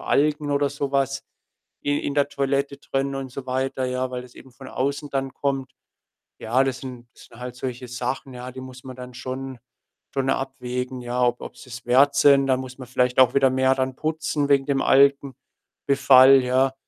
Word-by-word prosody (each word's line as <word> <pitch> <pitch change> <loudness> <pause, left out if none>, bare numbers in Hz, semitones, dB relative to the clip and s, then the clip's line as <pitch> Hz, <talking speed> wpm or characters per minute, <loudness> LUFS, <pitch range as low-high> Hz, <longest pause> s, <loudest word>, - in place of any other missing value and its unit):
Algen 150 0 +1
oder 145 0 +2
so 145 -1 -3
was 135 0 0 0.6
i 145 0 +1
in 140 - -3
der 145 -1 +2
Toilette 140 0 -1
drin 135 0 -2
und 135 -1 -5
so 130 +1 -8
weiter, 130 0 -1
ja, 125 0 -2
weil 125 -1 -5
das 125 -1 -15
eben 130 -1 -15
von 130 +1 -12
außen 140 +2 -2
dann 135 -1 -2
kommt. 135 -2 -2 0.7
Ja, 125 +4 +2
das 130 -1 -2
sind 125 -2 -9
sind 115 - -16
halt 125 0 -7
solche 125 0 -5
Sachen, 125 +2 -4
ja, 125 +1 -7
die 130 +1 -9
muss 130 0 -11
man 130 -1 -9
dann 125 0 -10
schon 130 0 -6 0.6
schon 135 -1 -1
abwägen, 125 -1 -4
ja, 125 +1 -1
ob 120 0 +1
ob - - -9
sie - - -14
es 120 0 -9
wert 135 +3 +5
sind. 140 -1 +5
Da 130 -1 +3
muss 130 0 -8
man 130 - -8
vielleicht 125 0 0
auch 130 -1 +6
wieder 135 -1 +5
mehr 130 0 +3
dann 130 -1 -2
putzen 155 -1 -2
wegen 140 -1 +4
dem 140 -1 +1
Algenbefall, 135 -1 +4
ja. 130 +1 +2
130 Hz, 195 wpm, -23 LUFS, 125-140 Hz, 0.7 s, auch